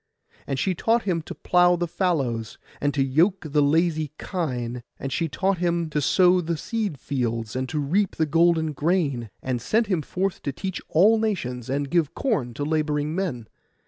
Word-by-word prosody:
And 135 Hz, -, -2 dB
she 185 Hz, +8 st, +1 dB
taught 225 Hz, +6 st, +1 dB
him 175 Hz, -4 st, 0 dB
to -, -, -8 dB
plough 180 Hz, 0 st, +4 dB
the 175 Hz, 0 st, -1 dB
fallows, 135 Hz, -, -1 dB, 0.2 s
and 145 Hz, -, +2 dB
to 135 Hz, -, +3 dB
yoke 165 Hz, +8 st, +2 dB
the 150 Hz, 0 st, +2 dB
lazy 155 Hz, 0 st, +2 dB
kine; 125 Hz, -9 st, -3 dB, 0.2 s
and 135 Hz, -, -5 dB
she 165 Hz, -, 0 dB
taught 190 Hz, +5 st, 0 dB
him 170 Hz, -2 st, 0 dB
to 150 Hz, 0 st, 0 dB
sow 180 Hz, +4 st, +4 dB
the 165 Hz, -1 st, -2 dB
seed 210 Hz, -, -3 dB
fields, 115 Hz, -4 st, -2 dB
and 130 Hz, 0 st, -2 dB
to 155 Hz, -, -3 dB
reap 175 Hz, +8 st, +1 dB
the 160 Hz, -, +1 dB
golden 160 Hz, 0 st, +2 dB
grain; 145 Hz, -, 0 dB
and 125 Hz, -2 st, -2 dB
sent 220 Hz, -, +2 dB
him 185 Hz, -6 st, 0 dB
forth 185 Hz, +5 st, -2 dB
to 140 Hz, -, -2 dB
teach 190 Hz, +7 st, -5 dB
all 210 Hz, +7 st, +5 dB
nations, 130 Hz, -, -2 dB
and 140 Hz, +1 st, -2 dB
give 165 Hz, -4 st, +1 dB
corn 145 Hz, -, -1 dB
to 145 Hz, -, -3 dB
labouring 150 Hz, 0 st, 0 dB
men. 160 Hz, -, -3 dB
160 Hz, 185 wpm, -24 LUFS, 135-180 Hz, 0.2 s, all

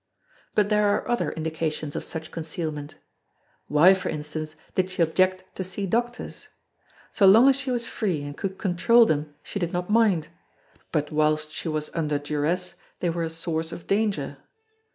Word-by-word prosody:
But 205 Hz, -1 st, +3 dB
there 210 Hz, -1 st, +3 dB
are 205 Hz, -, +1 dB
other 240 Hz, -, 0 dB
indications 160 Hz, -2 st, -3 dB
of -, -, -3 dB
such 160 Hz, -1 st, -6 dB
concealment. 155 Hz, -2 st, -4 dB, 0.7 s
Why 155 Hz, +6 st, +6 dB
for 190 Hz, -, -3 dB
instance 155 Hz, +1 st, -5 dB, 0.2 s
did 185 Hz, 0 st, +1 dB
she 185 Hz, -2 st, +1 dB
object 185 Hz, +3 st, +2 dB
to 190 Hz, -, -2 dB
see 190 Hz, +2 st, -3 dB
doctors? 240 Hz, +5 st, -2 dB, 0.6 s
So 195 Hz, -, +4 dB
long 225 Hz, +7 st, +8 dB
as 275 Hz, -, +6 dB
she 275 Hz, 0 st, -3 dB
was 240 Hz, -2 st, 0 dB
free 180 Hz, -10 st, -2 dB
and 145 Hz, 0 st, -6 dB
could 190 Hz, +3 st, -4 dB
control 215 Hz, +6 st, +4 dB
them 150 Hz, -5 st, -1 dB
she 200 Hz, -, -5 dB
did 175 Hz, -2 st, -1 dB
not 180 Hz, +3 st, -2 dB
mind; 200 Hz, -8 st, +3 dB, 0.6 s
but 150 Hz, -2 st, -1 dB
whilst 155 Hz, 0 st, +1 dB
she -, -, -5 dB
was 155 Hz, -1 st, -2 dB
under 150 Hz, -3 st, 0 dB
duress 150 Hz, +5 st, -1 dB, 0.3 s
they 175 Hz, -, 0 dB
were 170 Hz, 0 st, -3 dB
a 165 Hz, -, -1 dB
source 165 Hz, 0 st, -2 dB
of 170 Hz, -, -8 dB
danger. 195 Hz, -10 st, 0 dB
170 Hz, 175 wpm, -25 LUFS, 155-195 Hz, 0.7 s, long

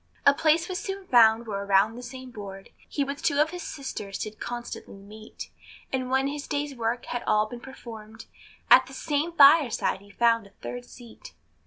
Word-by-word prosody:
A 280 Hz, -, +8 dB
place 320 Hz, +3 st, +2 dB
was 370 Hz, -1 st, -3 dB
soon 390 Hz, 0 st, -5 dB
found 230 Hz, -4 st, +5 dB
where 200 Hz, -2 st, -4 dB
around 200 Hz, +2 st, +3 dB
the 245 Hz, -, -8 dB
same 255 Hz, +1 st, -9 dB
board, 195 Hz, -3 st, -9 dB, 0.2 s
He 285 Hz, -, -1 dB
with 280 Hz, +1 st, -5 dB
two 285 Hz, -, +1 dB
of 310 Hz, +2 st, +3 dB
his 355 Hz, 0 st, -6 dB
sisters 240 Hz, -, -6 dB
did 215 Hz, 0 st, -6 dB
constantly 240 Hz, -3 st, -6 dB
meet; 210 Hz, +2 st, -11 dB, 0.4 s
And 255 Hz, -1 st, -1 dB
when 265 Hz, +1 st, +2 dB
his 285 Hz, +1 st, -4 dB
day's 290 Hz, -1 st, -2 dB
work 235 Hz, 0 st, -2 dB
had 245 Hz, -, -3 dB
all 215 Hz, 0 st, +3 dB
been 240 Hz, +2 st, -8 dB
performed, 225 Hz, -4 st, -11 dB, 0.5 s
At -, -, +8 dB
the -, -, -11 dB
same 300 Hz, +2 st, -1 dB
fireside 285 Hz, -, +5 dB
he 200 Hz, -, -17 dB
found 230 Hz, 0 st, +2 dB
a -, -, -23 dB
third 245 Hz, 0 st, -6 dB
seat. 240 Hz, -2 st, -14 dB
245 Hz, 190 wpm, -26 LUFS, 215-285 Hz, 0.5 s, A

